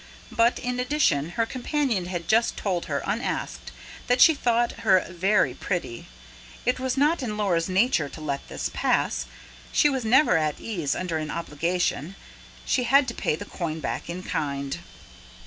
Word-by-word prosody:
But, 235 +1 +3
in 250 0 -3
addition, 250 - +1
her 230 - +3
companion 255 - -1
had 175 -2 -5
just 225 +5 +2
told 180 -4 -1
her, 140 -2 -2
unasked, 215 +5 -3 0.4
that 245 +1 +2
she 320 - +8
thought 240 -4 0
her 190 -4 +4
"very 190 +4 +2
pretty". 170 -11 -4 0.6
It 250 +1 +1
was 260 0 -1
not 300 +4 +3
in 215 -5 -3
Laura's 180 -5 +1
nature 185 - +2
to - - -10
let 145 -3 -4
this - - -4
pass: - - 0 0.4
she 295 - +4
was 265 -3 -1
never 245 - +5
at 155 -2 -1
ease 175 -11 -2
under 175 -3 -2
an 155 -1 -4
obligation; 170 +2 -2 0.5
she 250 -2 +1
had 275 +1 +5
to - - -5
pay 150 - 0
the 205 - -7
coin 165 -5 -4
back - - -4
in 180 +2 -5
kind. 140 -4 -3
195 Hz, 165 wpm, -25 LUFS, 165-245 Hz, 0.6 s, she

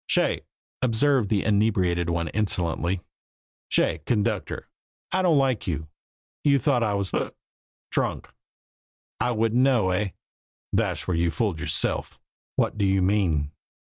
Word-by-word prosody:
"Shay," - - +1 0.4
observed 125 -1 +2
the 100 -3 +1
inebriated 95 -5 +2
one 85 -1 0
insolently, 90 -3 0 0.7
"shay, - - +2
conductor, 105 -4 -1 0.4
I 190 - +2
don't 170 -5 +4
like 130 -6 +1
you. 80 -3 -3 0.5
You 140 -1 +5
thought 135 -1 +2
I 105 -3 +1
was 100 -2 -2
hic! - - -2 0.6
s'drunk - - -1 0.9
I - - +1
wouldn't 115 +1 +2
know 125 -8 +3
eh? 100 +2 0 0.7
Thash - - 0
where 90 - +1
you 85 +1 +2
fooled 100 -3 -1
yerself!" 80 -3 -1 0.4
"What 105 - 0
do 100 - +3
you 95 -1 +2
mean?" 90 -7 +1
100 Hz, 135 wpm, -25 LUFS, 85-120 Hz, 0.9 s, You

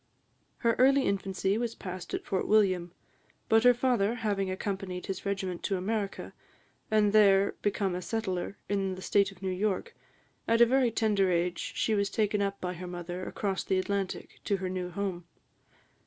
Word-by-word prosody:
Her 230 -1 +2
early 270 +2 +5
infancy 195 +1 0
was 235 -1 -2
passed 180 -1 -6
at - - -5
Fort 190 - -1
William; 185 -5 +3 0.6
but 225 0 +5
her 245 0 +7
father 240 -3 +1
having 205 -5 -1
accompanied 190 -1 -4
his 195 +1 -4
regiment 190 -3 -2
to 195 - 0
America, 200 +1 -3 0.6
and 215 -1 +3
there 200 -2 +5
become 200 -2 0
a 180 - -3
settler, 195 -2 -3
in 195 -2 -1
the 185 - -9
State 200 -1 +2
of 195 0 -16
New 190 - -1
York, 190 +1 -1 0.5
at 230 0 +3
a 235 - +9
very 255 +1 +3
tender 210 -4 +2
age 175 0 -1
she 220 - +1
was 200 -1 +1
taken 205 -1 +1
by 180 0 -3
her 180 +1 -7
mother 175 +1 -5
across 195 -2 -2
the 190 - 0
Atlantic, 195 0 -3
to 200 - +1
her 185 -1 -3
new 180 -1 -3
home. 180 -1 -4
195 Hz, 170 wpm, -29 LUFS, 185-215 Hz, 0.6 s, a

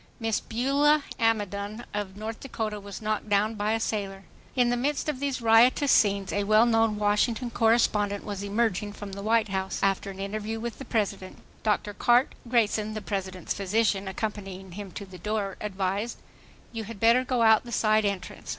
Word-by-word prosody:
Miss 225 -2 0
Beulah 280 +5 +2 0.2
Amidon 210 -1 -1
of 205 -2 -4
North 220 +1 -5
Dakota 220 -5 -4
was 200 +1 -9
knocked 215 0 -2
down 205 +2 +2
by 210 0 -1
a 225 - 0
sailor. 195 -3 -3 0.3
In 245 -2 +3
the - - +2
midst 280 +5 -1
of 295 -4 -2
these 275 -3 -2
riotous 235 +5 +5
scenes, 200 -2 +3
a 205 - +1
well 215 +3 +5
known 225 -2 +2
Washington 220 +4 +1
correspondent 215 -3 +2
was 200 -2 -4
emerging 205 0 -1
from 205 -1 -8
the 200 +1 -6
White 220 +1 +2
House, 190 0 -2
after 195 0 +1
an 195 0 -9
interview 215 +3 -3
with 235 0 -5
the 270 - -7
President. 205 -4 -2 0.2
Dr. 210 -1 0
Cart' 245 +5 +3 0.2
Grayson, 215 -2 +1
the 215 - -4
President's 190 -3 -3
physician, 200 0 0
accompanying 195 -1 -5
him 200 +2 -7
to 200 - -6
the 185 -2 -12
door, 205 0 -2
advised: 200 +2 -2 0.5
"You 225 -2 -5
had 220 -1 -9
better 235 +4 +5
go 250 -2 +1
out 220 -1 +6
the 240 - -10
side 215 -1 +3
entrance. 200 -3 -4
215 Hz, 180 wpm, -27 LUFS, 200-230 Hz, 0.5 s, out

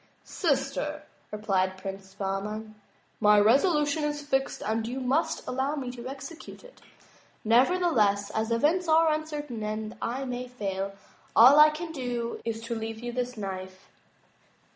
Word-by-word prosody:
"Sister," 295 -1 -1 0.3
replied 190 -3 0
Prince 195 0 -8
Bahman, 210 +2 -4 0.5
"my 210 -1 +6
resolution 295 - +3
is 295 0 -2
fixed 270 -2 -1
and 220 +1 -1
you 250 +3 -4
must 265 +5 0
allow 265 +3 -1
me 260 -4 -4
to 245 0 -8
excute 275 +5 -9
it. - - -16 0.6
Neverless, 230 - +3
as 220 +1 -1
events 300 +10 +2
are 320 0 +5
uncertain 295 -6 -4
and 215 +1 -4
I 260 +4 -2
may 250 0 -4
fail, 195 -5 -4 0.4
all 260 +6 +8
I 305 0 +9
can 320 +2 -6
do 245 -5 -4
is 225 -1 -3
to 235 +1 -3
leave 225 0 -4
you 240 - -3
this 250 0 -3
knife." 190 -2 -7
245 Hz, 140 wpm, -28 LUFS, 215-295 Hz, 0.6 s, I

